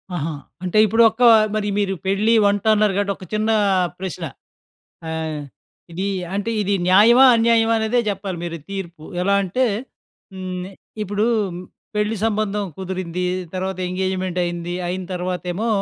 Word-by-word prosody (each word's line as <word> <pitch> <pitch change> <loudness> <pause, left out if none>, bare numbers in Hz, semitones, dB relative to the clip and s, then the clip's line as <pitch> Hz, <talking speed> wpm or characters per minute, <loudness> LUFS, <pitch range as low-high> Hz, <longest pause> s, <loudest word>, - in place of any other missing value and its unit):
ఆహా! 160 0 -2 0.3
అంటే 180 +3 -1
ఇప్పుడు 225 +2 +4
ఒక్క 225 +3 -2 0.3
మరి 210 -1 -1
మీరు 195 -2 0
పెళ్లి, 200 +4 +2
వంట 200 0 +2
అన్నారు 210 -2 +2
కాబట్టి 200 0 0
ఒక 185 - -11
చిన్న 215 +1 0 0.5
ప్రశ్న. 185 -2 -5 0.8
ఆహ్, 160 -1 -3 0.5
ఇది 185 +4 -3 0.3
అంటే 205 +3 -1
ఇది 200 0 0
న్యాయమా? 220 +8 +7
అన్యాయమా? 230 0 +3
అనేదే 220 +2 +1
చెప్పాలి 195 -2 -4
మీరు 170 -1 -5
తీర్పు. 175 -5 -6 0.2
ఎలా 200 +2 +2
అంటే 195 +8 0 0.7
హ్మ్. 185 -1 -5
నే 190 - -9 0.3
ఇప్పుడు 205 +1 -1 0.7
పెళ్లి 210 +1 0
సంబంధం 210 -2 0
కుదిరింది. 185 -2 -4 0.3
తర్వాత 190 0 -3
ఎంగేజ్మెంట్ 185 0 -2
అయింది. 175 0 -4
అయిన 185 +1 -3
తర్వాతేమో 180 +3 -3
195 Hz, 135 wpm, -21 LUFS, 180-210 Hz, 0.8 s, న్యాయమా